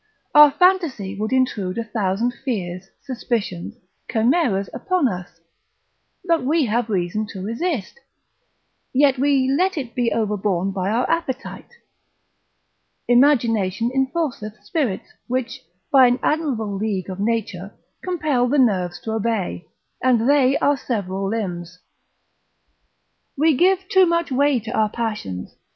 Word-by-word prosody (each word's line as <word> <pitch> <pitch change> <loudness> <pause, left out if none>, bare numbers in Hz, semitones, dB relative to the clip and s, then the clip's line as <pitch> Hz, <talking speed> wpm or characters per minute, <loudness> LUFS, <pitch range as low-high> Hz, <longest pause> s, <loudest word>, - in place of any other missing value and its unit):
Our 295 0 +9
fantasy 295 - +1
would 215 +2 -2
intrude 230 -8 0
a 230 - -1
thousand 220 +1 -1
fears, 190 -7 -5
suspicions, 230 -8 -3 0.4
chimeras 225 - +2
upon 365 -7 +1
us, 180 -5 -6 0.9
but 335 -5 +2
we 300 +3 +2
have 235 +1 -1
reason 200 +2 -1
to 195 -3 -7
resist, 250 - -3 0.9
yet 275 -1 +3
we 275 -1 +2
let 355 +7 +1
it 250 -5 -4
be 240 -1 0
overborne 200 -4 0
by 190 0 -2
our 235 +4 +1
appetite; 330 - -4 1.3
imagination 235 -5 +3
enforceth 265 -6 -2
spirits, 225 - -2 0.2
which, 255 0 -3 0.3
by 265 -2 +7
an 245 +1 +2
admirable 255 -10 -1
league 195 -2 -2
of 185 - -7
nature, 205 -3 -2 0.3
compel 300 -9 0
the 285 +4 +1
nerves 185 -9 +1
to 220 - -4
obey, 220 -5 -2 0.3
and 245 -2 +2
they 275 -1 +4
our 285 0 +2
several 195 -6 -3
limbs: 180 -5 -4 1.6
we 310 +1 +3
give 375 +5 +2
too 375 -1 +5
much 335 -3 0
way 280 0 +2
to 220 +1 -7
our 215 -3 +1
passions. 210 - -4
235 Hz, 125 wpm, -21 LUFS, 200-280 Hz, 1.6 s, Our